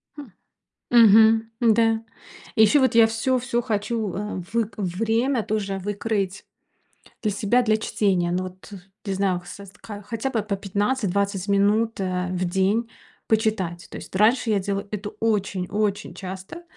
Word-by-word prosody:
Хм. 295 - -8 0.7
Мгм. 225 -1 +7 0.2
Да. 225 0 +3 0.5
И 220 - +4
ещё 250 +7 +5
вот 260 -3 +2
я 230 -1 +7
всё 225 +3 0
всё 240 -1 -1
хочу, 220 -3 -2
э, 210 +1 -4 0.2
вык 230 -2 0
время 225 +6 0
тоже 200 -2 -2
выкроить 200 -1 -2 0.8
для 210 - 0
себя 220 +5 +2
для 220 -2 +2
чтения. 190 -5 0
Ну, 185 +1 -1
вот, 185 +2 -10
э, - - -7 0.3
не 195 - -2
знаю 190 -2 0
с 200 +2 -10
ка 205 -2 -8
хотя 230 +5 -3
бы 230 -5 -1
по 205 -2 -2
15-20 200 -1 -1
минут, 205 +3 +2
а, 185 -1 -1
в 185 0 -1
день 195 +6 0 0.4
почитать. 215 -6 0
То - - -8
есть - - -10
раньше 225 +4 +3
я 210 - +2
делала 200 +1 -3
это 210 0 -4
очень, 200 -4 0
очень 205 -1 -1
часто. 190 - -8
210 Hz, 155 wpm, -24 LUFS, 195-225 Hz, 0.8 s, Мгм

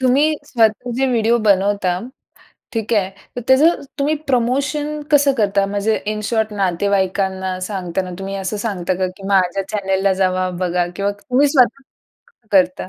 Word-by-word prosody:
तुम्ही 260 +3 +3 0.2
स्वतःचे 240 +2 +1
व्हिडिओ 235 0 +2
बनवता, 195 -2 +2 0.7
ठीक 225 -1 -3
आहे. 195 -3 +1 0.3
तर - - -2
त्याचं 295 +6 +5 0.2
तुम्ही 285 +2 +1
प्रमोशन 280 +4 0
कसं 285 -1 +5
करता? 200 -2 +2
म्हणजे 205 +2 0 0.2
इन 215 - -4
शॉर्ट 220 -2 0
नातेवाईकांना 190 -1 0
सांगताना 185 -2 -3
तुम्ही 195 0 -5
असं 195 +2 -3
सांगता 185 -4 -1
का? 185 +1 -1
की 195 -1 -9
माझ्या 195 -1 +2
चॅनेलला 195 -2 0
जावा, 185 0 +1
बघा 180 -1 0
किंवा 200 0 0
तुम्ही 260 +5 +2
स्वत 275 -1 +3 0.7
करता? 185 -1 +2
205 Hz, 140 wpm, -19 LUFS, 190-245 Hz, 0.7 s, त्याचं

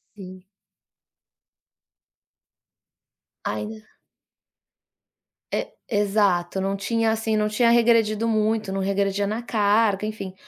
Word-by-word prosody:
Sim. 185 -2 -11 3.0
Ai 215 0 -4 1.7
E - - -1 0.2
exato, 200 -4 +1
não 195 +1 -1
tinha 225 +3 0
assim, 220 0 -1
não 210 - +1
tinha 225 +3 +2
regredido 230 -2 +3
muito, 215 -2 0
não 195 0 -2
regredia 200 +1 0
na 220 +3 -3
carga 210 -2 +2
enfim. 215 -3 -6
210 Hz, 90 wpm, -23 LUFS, 195-220 Hz, 3.0 s, regredido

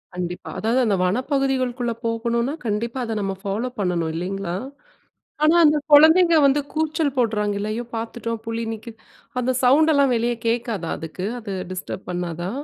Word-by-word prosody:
கண்டிப்பா. 180 0 -5
அதாவது 230 +4 +1
அந்த 205 -3 +2
வனப்பகுதிகள்குள்ள 255 +1 0
போகணுன்னா, 235 +3 0
கண்டிப்பா 230 +4 -2
அத 225 -2 -3
நம்ம 195 -1 -2
ஃபாலோப் 225 +5 -3
பண்ணணும் 175 -4 0
இல்லேங்களா! 180 0 -3 0.9
ஆனா, 310 +2 +5
அந்த 300 0 +5
குழந்தைங்க 325 +4 +7
வந்து 280 +1 +4
கூச்சல் 310 -2 0
போடுறாங்கல்ல. 210 -3 0
அய்யோ! 240 +2 -4
பார்த்துட்டோம் 230 0 -4
புலி 230 0 -2
நிக்கிது. 225 +1 -10 0.4
அந்த 255 +1 +1
சவுண்ட் 300 +6 +5
எல்லாம் 280 -3 +3
வெளியே 235 +1 0
கேட்காதா? 230 -7 -1
அதுக்கு 165 +3 -6
அது 210 -4 -6 0.2
டிஸ்டர்ப் 185 +1 -6
பண்ணாதா? 175 0 -3
230 Hz, 140 wpm, -22 LUFS, 200-260 Hz, 0.9 s, குழந்தைங்க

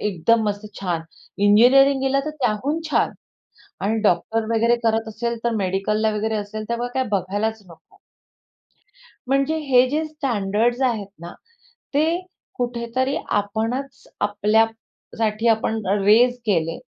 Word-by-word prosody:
एकदम 210 +3 +1
मस्त 205 +1 -4 0.2
छान. 175 -4 -1 0.4
इंजिनिअरिंग 250 +7 +5
गेला 270 +1 +2
तर - - -1
त्याहून 260 +8 0
छान. - - +2 0.7
आणि 220 +3 0
डॉक्टर 220 +3 +1
वगैरे 230 +1 +3
करत 225 0 +1
असेल 235 +2 -3
तर 235 - +2
मेडिकलला 205 +3 0
वगैरे 220 +1 -1
असेल 215 +1 -5
त्यामुळे 235 +1 -2
काय 260 - +1
बघायलाच 205 +3 -1
नको. 170 -2 -18 1.3
म्हणजे 275 +4 +1
हे 255 -1 +5
जे 310 +3 0
स्टँडर्ड्स 240 -4 -1
आहेत 210 -4 -5
ना, 170 +1 -8 0.6
ते 320 +4 +2 0.4
कुठेतरी 245 +2 -1
आपणच 225 +7 -2
आपल्यासाठी 220 +1 0
आपण 220 0 +1 0.2
रेझ 230 +5 +5
केले. 165 -5 0
225 Hz, 120 wpm, -22 LUFS, 205-250 Hz, 1.3 s, इंजिनिअरिंग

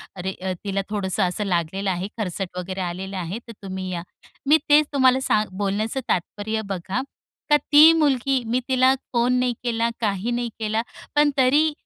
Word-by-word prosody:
"अरे 190 +1 -4
अ, 190 -1 -1
तिला 195 -1 -1
थोडंसं 200 -1 -1
असं 185 +3 -1
लागलेलं 190 +2 -1
आहे. 185 +1 -2
खरचट 185 -3 -4
वगैरे 185 +1 -4
आलेलं 185 +2 -4
आहे 180 +4 -4
तर 230 - -8
तुम्ही 190 -1 -5
या." 170 -1 -4 0.4
मी 305 +3 +7
तेच 295 +1 +6
तुम्हाला 260 -1 +4
सांग 215 -4 +2
बोलण्याचं 205 +5 -1
तात्पर्य 215 +5 -1
बघा. 195 +5 -2 0.5
का 295 - +6
ती 300 +3 +7
मुलगी 270 -4 +1
मी 250 +2 +2
तिला 260 0 +4 0.2
फोन 240 +1 +2
नाही 250 -1 +1
केला, 230 -1 0
काही 205 +2 -1
नाही 240 0 -1
केला, 220 +1 0 0.3
पण 295 0 +5
तरी 290 +5 +4
215 Hz, 170 wpm, -23 LUFS, 190-255 Hz, 0.5 s, मी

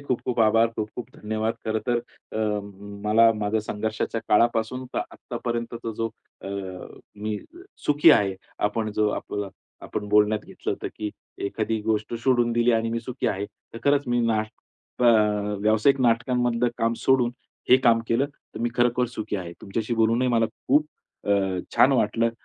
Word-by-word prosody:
खूप-खूप 125 -3 -2
आभार. 115 +1 +5
खूप-खूप 110 +3 -5
धन्यवाद 110 +1 -2
खरंतर 110 +2 0 1.0
मला 115 +2 +6
अ, - - +4
माझ्या 105 0 -1
संघर्षाच्या 110 +2 -3
काळापासून 115 +3 +2
तर - - +1
आत्तापर्यंतचा 115 -1 -4
जो 115 0 -1 0.4
मी 100 +2 -6
अ, 340 +2 -16 0.3
सुखी 150 +2 +6
आहे. 100 -8 +4 0.2
आपण 110 +1 0
जो 105 0 +2
आपला 100 -1 -4 0.4
आपण 105 - -4
बोलण्यात 105 +1 +4
घेतलं - - -5
होतं, - - -5
की 105 -1 -3 0.4
एखादी 110 +1 -2
गोष्ट 110 +1 -1
सोडून 120 -3 +3
दिली 120 +1 +3
आणि 115 0 +1
मी 115 0 -1
सुखी 125 +2 -4
आहे 100 +1 -2
तर 105 +2 -14
खरंच 145 0 +3
मी 120 0 +2
नाटक 110 +2 -4
अ, - - +4 0.6
व्यावसायिक 110 +6 +3
नाटकांमधलं 120 0 +2
काम 115 0 +2
सोडून, 125 -3 +3 0.4
हे 130 - +10
काम 120 -3 +4
केलं 125 +5 +2
तर 145 -5 -13
मी 120 - +1
खरोखर 120 0 +2
सुखी 105 -1 -3
आहे. 85 -2 -6
तुमच्याशी 110 +4 -3
बोलूनही 115 +3 +2
मला 115 -2 +3 0.2
खूप 150 +3 +4 0.4
अ, 100 - +3 0.4
छान - - +6
वाटलं. 115 0 +2
115 Hz, 150 wpm, -25 LUFS, 110-120 Hz, 1.0 s, हे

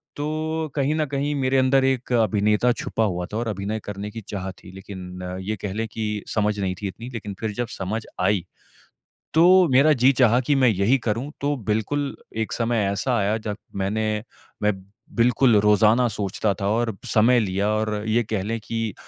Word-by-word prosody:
तो 155 +1 -2
कहीं 145 +1 +1
न 155 - +1
कहीं 145 +1 -1
मेरे 135 -1 +1
अंदर 130 +1 +4
एक 130 -2 -1
अभिनेता 105 +1 +3
छुपा 115 -1 -2
हुआ 90 -4 -1
था 110 - -1
और 115 - -2
अभिनय 105 +1 -3
करने 105 0 -5
की 115 +1 -7
चाह 95 -1 -4
थी। 95 0 -14
लेकिन 95 -1 -9 0.2
ये 105 +3 -2
कह 95 -2 -3
ले 110 +1 -2
कि 105 -1 -3
समझ 105 -1 0
नहीं 95 -2 -1
थी 100 - -2
इतनी। 115 +7 -8
लेकिन 105 -3 -5
फिर 110 -1 -2
जब 120 - -2
समझ 105 +4 -3
आई। 100 -5 +2 0.9
तो 160 +1 +5 0.3
मेरा 140 +4 +5
जी 130 - +7
चाहा 120 -1 +5
कि 140 +3 +1
मैं 130 -2 +4
यही 105 +5 +3
करूँ। 120 +4 -2
तो 145 +1 +1
बिल्कुल 140 +7 -1 0.3
एक - - -8
समय 115 -2 0
ऐसा 120 +6 0
आया 105 +1 +1
जब 105 -1 -5 0.2
मैंने 100 +3 -1 0.6
मैं 105 0 +3 0.4
बिल्कुल 120 0 +4
रोज़ाना 105 +4 +4
सोचता 100 +1 0
था 100 - 0
और 115 -1 0 0.2
समय 120 +3 +5
लिया 100 -1 0
और 110 0 0
ये 115 +2 +2
कह 105 -3 -2
ले 115 +2 -2
कि 115 -1 -3
110 Hz, 190 wpm, -23 LUFS, 105-125 Hz, 0.9 s, जी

